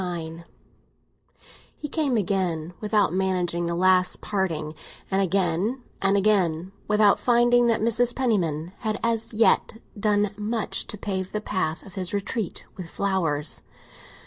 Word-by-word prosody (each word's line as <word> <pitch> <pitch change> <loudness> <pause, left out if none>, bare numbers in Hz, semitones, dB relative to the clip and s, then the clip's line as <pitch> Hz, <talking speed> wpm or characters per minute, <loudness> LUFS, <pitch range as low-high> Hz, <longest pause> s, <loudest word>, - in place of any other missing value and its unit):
XXIX 170 -2 -5 1.3
HE 295 - -5
came 290 -5 0
again, 180 -5 -1
without 210 -5 +2
managing 180 -2 0
the 170 - -1
last 185 +1 +3
parting; 165 -7 -2 0.4
and 190 +1 +2
again 195 +6 0 0.2
and 195 +1 +3
again, 190 -4 +1 0.2
without 210 -1 +4
finding 240 0 +4
that 230 -2 +2
Mrs. 235 +2 +2
Penniman 175 - 0
had 215 -1 -2
as 230 -1 0
yet 225 0 +2 0.2
done 210 -1 +2
much 220 +1 -2
to 210 - -4
pave 190 -2 -3
the 210 - 0
path 175 -6 -2
of 190 -1 -3
retreat 205 -1 -3
with 180 -3 -8
flowers. 165 -7 -1
195 Hz, 130 wpm, -25 LUFS, 175-215 Hz, 1.3 s, without